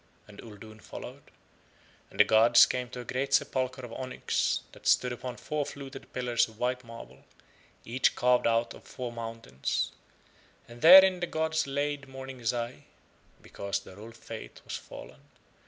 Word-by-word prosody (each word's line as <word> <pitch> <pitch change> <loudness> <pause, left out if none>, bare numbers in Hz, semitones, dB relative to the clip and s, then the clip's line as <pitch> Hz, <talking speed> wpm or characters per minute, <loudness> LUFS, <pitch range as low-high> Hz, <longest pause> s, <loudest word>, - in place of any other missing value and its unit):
And 105 -1 -14
Uldoon 110 0 -12
followed. - - -10 0.8
And - - -15
the - - +10
gods 115 +2 +6
came 125 -1 -3
to 125 - -7
a - - -11
great 135 +3 0
sepulchre 130 -1 -1
of 115 - -10
onyx 130 -1 -1
that - - -10
stood 125 -1 +3
upon 120 0 -7
four 150 +4 -2
fluted 135 -1 -9
pillars 120 -2 +1
of 110 -1 -17
white 125 +1 -1
marble, 115 - -12 0.6
each 125 +3 +1
carved 125 -1 +3
out 115 0 +1
of - - -14
four 125 -2 -6
mountains, 115 - -3 0.8
and 120 0 -13
therein 185 +2 +9
the 175 - -2
gods 160 -2 -1
laid 140 0 -2
Morning 135 -1 -9
Zai 120 +1 -3 0.6
because 100 0 -4
the 95 - -14
old 115 +3 -12
faith - - -10
was - - -5
fallen. - - -11
125 Hz, 155 wpm, -29 LUFS, 115-135 Hz, 0.8 s, the